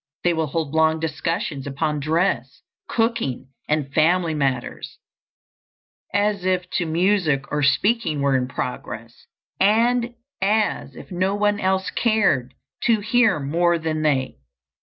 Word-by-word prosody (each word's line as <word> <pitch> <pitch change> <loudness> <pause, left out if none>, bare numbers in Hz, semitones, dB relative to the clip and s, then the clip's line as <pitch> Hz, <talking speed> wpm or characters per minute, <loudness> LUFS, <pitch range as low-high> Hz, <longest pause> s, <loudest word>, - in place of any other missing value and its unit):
They 175 - +3
will 160 -1 -1
hold 155 0 -3
long 160 0 +3
discussions 160 -2 -3
upon 150 +2 -1
dress, 160 +6 -1 0.3
cooking, 225 - -1 0.2
and 150 -3 -1
family 165 +2 +3
matters, 135 -5 -2 1.1
as 205 -1 +1
if 185 -1 +1
no 175 - -1
music 165 -5 +1
or 150 - 0
speaking 155 - +2
were 140 -1 +2
in 125 -1 +1
progress, 115 -2 -6 0.3
and 235 +4 +2 0.3
as 210 +2 0
if - - -12
no 185 +2 0
one 205 0 +1
else 190 0 0
cared 195 - +1 0.3
to 225 -3 +3
hear 225 -4 +3
more 170 +5 +1
than 160 -1 -2
they. 135 - 0
165 Hz, 130 wpm, -22 LUFS, 145-205 Hz, 1.1 s, They